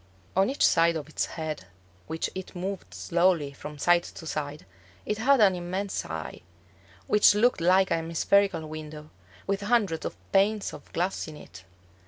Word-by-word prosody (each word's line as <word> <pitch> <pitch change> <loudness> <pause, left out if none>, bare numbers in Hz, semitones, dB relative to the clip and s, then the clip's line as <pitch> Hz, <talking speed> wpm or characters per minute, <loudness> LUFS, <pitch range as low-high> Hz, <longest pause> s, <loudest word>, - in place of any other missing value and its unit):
On 195 +4 +3
each 275 - +2
side 165 0 +4
of 150 -2 -4
its 155 - -1
head, 155 - -5 0.4
which 160 0 -2
it 190 0 -7
moved 190 +2 -5
slowly 170 -5 +1
from 150 +2 -9
side 175 +3 +4
to 170 - -10
side, 150 -3 -4 0.4
it 210 0 -2
had 270 +4 +4
an 200 -3 +6
immense 185 +3 -3
eye, 80 -1 -6 0.6
which 210 -1 +5
looked 225 -3 +3
like 185 +2 +4
a 165 - +3
hemispherical 165 +2 +1
window, 155 0 -8 0.3
with 200 +1 -1
hundreds 205 -6 +1
of - - -5
panes 205 +2 +2
of - - -12
glass 180 +2 -2
in 155 -1 -9
it. 90 -7 -13
175 Hz, 165 wpm, -27 LUFS, 155-195 Hz, 0.6 s, an